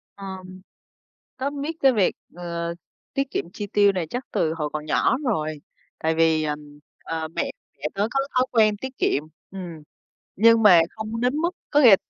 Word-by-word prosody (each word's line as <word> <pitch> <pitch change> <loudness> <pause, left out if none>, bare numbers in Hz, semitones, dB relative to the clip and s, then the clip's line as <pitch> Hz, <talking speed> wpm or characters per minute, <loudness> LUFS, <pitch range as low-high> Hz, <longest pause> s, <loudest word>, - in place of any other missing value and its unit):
Ờm, 190 -1 -8 0.8
tớ 265 +2 -1
biết 290 +3 -4
cái 270 -1 +6
việc, 205 -5 +2 0.2
ờ, 170 -1 -4 0.4
tiết 275 0 0
kiệm - - -1
chi 205 - -5
tiêu 205 0 +4
này 180 -4 -2
chắc 250 +2 -3
từ 160 0 +1
hồi 150 -2 -3
còn 155 0 -4
nhỏ 200 +10 +2
rồi. 155 - -1 0.4
Tại 160 0 0
vì, 160 -1 +3 0.6
ờ, 160 -1 -3
mẹ 165 - -2 0.3
mẹ 140 - -14
tớ 200 +2 0
có 270 - +1 0.2
thói 255 0 +4
quen 215 -3 +4
tiết 260 +4 -7
kiệm, 140 - +2 0.3
ừm, 175 -5 -7 0.5
nhưng 230 +2 +6
mà 185 -6 +8
không 220 +1 -5
đến 250 +3 +1
mức 335 +3 +1 0.2
có 290 - +5
nghĩa 250 -5 +9
là 195 - +9
200 Hz, 185 wpm, -24 LUFS, 165-245 Hz, 0.8 s, nghĩa